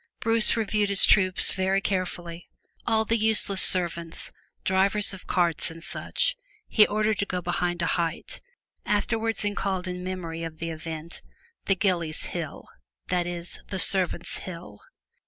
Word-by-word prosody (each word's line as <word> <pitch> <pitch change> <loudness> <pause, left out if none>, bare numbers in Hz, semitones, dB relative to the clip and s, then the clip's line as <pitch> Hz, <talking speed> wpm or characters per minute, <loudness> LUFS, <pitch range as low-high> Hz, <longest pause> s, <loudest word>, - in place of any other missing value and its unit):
Bruce 225 0 +5
reviewed 210 -2 0
his 200 -1 +6
troops 185 -2 +4
very 190 +1 0
carefully; 175 -3 -4 0.4
all 220 -1 +2
the 230 +1 +1
useless 210 -3 +3
servants, 170 -2 +1 0.3
drivers 195 +2 +3
of 190 - -11
carts, 175 -3 +1
and 165 0 -11
such - - -1 0.3
he 215 - +5
ordered 215 0 0
to 200 - +1
go 180 - -2
behind 175 0 -2
a - - +1
height, 170 -1 -2 0.4
afterwards 225 +1 0
called 190 -2 -2
in 180 0 -5
memory 175 -3 -5
of 165 -1 -6
the 165 +1 -4
event, 160 0 -7 0.4
the 195 - +2
Gillies' 175 -5 -1
Hill, 165 -4 -6 0.4
that 180 -1 0
is 175 0 -3
the 190 - -4
servant's 185 -1 +2
hill. 180 -1 -9
185 Hz, 145 wpm, -26 LUFS, 170-205 Hz, 0.4 s, his